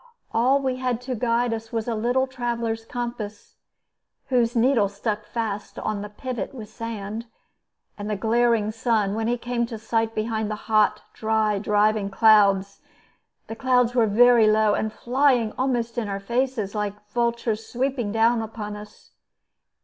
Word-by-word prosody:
All 255 +4 +3
we 260 -2 -1
had 250 -2 -1
to 255 +1 -4
guide 235 0 +1
us 225 0 -6
was 225 -1 -2
a 235 - 0
little 245 +4 +1
traveler's 235 -3 -3
compass 230 -4 -6 0.7
(whose 240 -2 +2
needle 230 -4 +3
stuck 210 +1 -3
fast 215 -3 -4
on 215 -2 -3
the 210 - -6
pivot 255 +5 -5
with 215 -4 -8
sand) 225 0 -6 0.7
and 205 +1 -4
the 210 - 0
glaring 225 0 +2
sun, 220 -3 0
when 220 +1 -1
he 240 +1 +1
came 240 0 -2
to 230 -2 -6
sight 225 0 -1
behind 220 0 -1
the 215 - -2
hot, 215 -1 +2
dry, 220 -2 +1
driving 210 0 +2
clouds. 200 -2 +4 0.6
The 225 - -7
clouds 250 0 +2
were 235 -3 +3
very 235 +1 +6
low, 215 -1 +4
and 220 +1 -1
flying 250 -2 +2
almost 240 -3 -1
in 220 - -3
our 195 0 -3
faces, 235 -1 -1
like 210 -1 -4
vultures 235 -1 -1
sweeping 250 -3 -1
down 225 +2 +3
on 215 -1 -6
us. 210 0 -13
225 Hz, 155 wpm, -24 LUFS, 215-240 Hz, 0.7 s, very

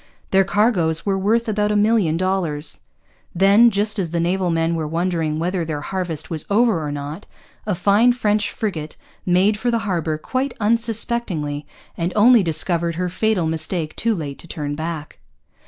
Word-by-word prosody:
Their 195 0 +5
cargoes 185 -6 +1
were 200 -1 +1
worth 220 +5 +1
about 210 -1 0
a - - +1
million 205 -6 +2
dollars. 170 -5 -2 0.6
Then, 200 +6 +6
just 210 0 -1
as 175 -4 -1
the 170 +1 -2
naval 180 +2 0
men 165 0 +1
were 160 -2 -2
wondering 165 -1 -1
whether 175 +2 -1
their 155 -2 -4
harvest 170 -3 -4
was 160 -2 -2
over 215 -4 +3
or 150 - -3
not, 145 +6 -6 0.4
a 205 - 0
fine 210 +7 +4
French 215 -3 0
frigate 160 -8 -4 0.3
made 190 +4 +3
for 245 - 0
the 230 -2 -1
harbour 165 -5 -1
quite 255 - -3
unsuspectingly, 220 -9 0 0.3
and 170 +2 -2
only 230 +2 +6
discovered 170 0 0
her 180 +1 -2
fatal 190 -1 0
mistake 160 0 -2
too 230 -1 0
late 145 -5 -6
to - - -12
turn 145 -3 -4
back. 160 0 -5
180 Hz, 170 wpm, -21 LUFS, 160-210 Hz, 0.6 s, Then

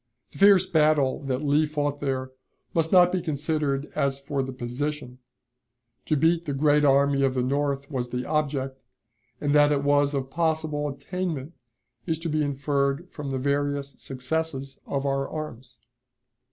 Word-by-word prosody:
The - - -13
fierce 195 -2 +7
battle 155 -6 +2
that 130 +1 -2
Lee 150 +2 +3
fought 145 -1 -2
there 130 -2 -2 0.4
must 165 -1 +1
not 180 -1 +6
be 185 - 0
considered 150 -2 -1
as 140 0 0
for 140 0 -2
the 130 0 -4
position; 130 +1 -4 0.9
to 155 - +2
beat 165 +3 +2
the 145 - -2
great 150 +1 +3
army 140 0 +4
of 135 -1 +2
the 125 - +1
North 140 +1 -1
was 125 -3 -2
the 125 +1 -3
object, 140 -3 -1 0.6
and 145 -1 0
that 145 0 +5
it 140 -1 +1
was 145 0 +3
of 135 -1 -3
possible 155 -2 0
attainment 155 +1 -4 0.5
is 160 -2 0
to 165 +1 -4
be 155 0 +1
inferred 140 +3 -1
from 145 -2 -6
the 135 - -2
various 140 +1 -1
successes 135 +1 -3
of 140 0 -2
our 135 0 0
arms. 130 -5 -7
145 Hz, 160 wpm, -26 LUFS, 135-155 Hz, 0.9 s, fierce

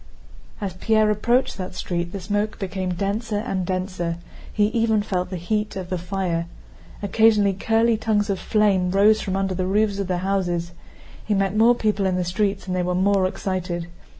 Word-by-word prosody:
As 200 -4 -3
Pierre 215 +3 +2
approached 235 +3 +1
that 185 0 -5
street 175 -1 -3
the 195 - -5
smoke 205 +3 -2
became 185 -2 -3
denser 205 +4 -2
and 195 -5 -2
denser—he 185 +2 -3
even 220 -2 +1
felt 180 -4 -2
the 185 - -4
heat 210 +5 -2
of 185 -2 -6
the 185 - 0
fire. 175 -2 -2 0.6
Occasionally 210 0 +4
curly 225 +3 +2
tongues 210 -2 +1
of 195 - -2
flame 200 -4 +2
rose 205 +3 +4
from 190 -2 -2
under 195 -1 0
the 185 0 -2
roofs 205 +1 +1
of 200 - -2
the 180 -1 0
houses. 175 -3 -1 0.5
He 210 - 0
met 195 0 0
more 230 +3 +5
people 210 -4 0
in 185 - 0
the 180 - 0
streets 200 +3 -1
and 185 -1 -2
they 180 - +1
were 180 0 -1
more 190 0 +3
excited. 180 -2 -3
195 Hz, 180 wpm, -23 LUFS, 185-210 Hz, 0.6 s, more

